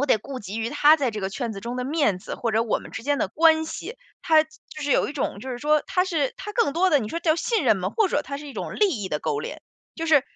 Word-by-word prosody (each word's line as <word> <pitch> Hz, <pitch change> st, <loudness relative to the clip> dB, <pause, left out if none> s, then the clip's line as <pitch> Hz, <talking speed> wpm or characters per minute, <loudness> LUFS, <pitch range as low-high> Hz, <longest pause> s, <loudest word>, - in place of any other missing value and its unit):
我 285 Hz, -, +1 dB
得 225 Hz, -, +4 dB
顾 270 Hz, +4 st, -7 dB
及 205 Hz, +2 st, -6 dB
于 225 Hz, +1 st, -2 dB
他 295 Hz, +2 st, +6 dB
在 275 Hz, -5 st, 0 dB
这 215 Hz, -1 st, -5 dB
个 190 Hz, -, -2 dB
圈 235 Hz, +1 st, -3 dB
子 200 Hz, -, -7 dB
中 235 Hz, +4 st, -5 dB
的 250 Hz, -, -2 dB
面 280 Hz, -, +1 dB
子， -, -, -7 dB
或 230 Hz, -2 st, -2 dB
者 225 Hz, +1 st, +3 dB
我 225 Hz, -, 0 dB
们 -, -, -12 dB
之 -, -, -6 dB
间 285 Hz, +2 st, 0 dB
的 -, -, 0 dB
关 320 Hz, 0 st, +4 dB
系， 385 Hz, +8 st, -6 dB, 0.3 s
它 315 Hz, -1 st, +5 dB
就 310 Hz, -, -29 dB, 0.3 s
是 285 Hz, -1 st, +1 dB
有 -, -, +2 dB
一 -, -, -5 dB
种 260 Hz, -8 st, -3 dB
就 260 Hz, -, -6 dB
是 245 Hz, -, -4 dB
说 300 Hz, +3 st, +2 dB
它 365 Hz, -, +1 dB
是 320 Hz, -8 st, 0 dB
它 420 Hz, +2 st, -7 dB
更 415 Hz, -, +2 dB
多 370 Hz, +2 st, +3 dB
的 295 Hz, -, +5 dB
你 215 Hz, -5 st, -4 dB
说 335 Hz, -, -3 dB
叫 320 Hz, -2 st, +3 dB
信 440 Hz, -, 0 dB
任 220 Hz, -4 st, +4 dB
吗？ 185 Hz, 0 st, -1 dB
或 430 Hz, -, +2 dB
者 295 Hz, -, 0 dB
他 280 Hz, 0 st, -5 dB
是 295 Hz, -, -9 dB
一 280 Hz, -, -8 dB
种 -, -, -5 dB
利 420 Hz, -, +3 dB
益 190 Hz, -, -3 dB
的 150 Hz, -, -1 dB
勾 145 Hz, -, -2 dB
连。 -, -, -6 dB, 0.4 s
就 330 Hz, -, -3 dB
是 295 Hz, -4 st, +5 dB
285 Hz, 335 characters per minute, -24 LUFS, 230-320 Hz, 0.4 s, 他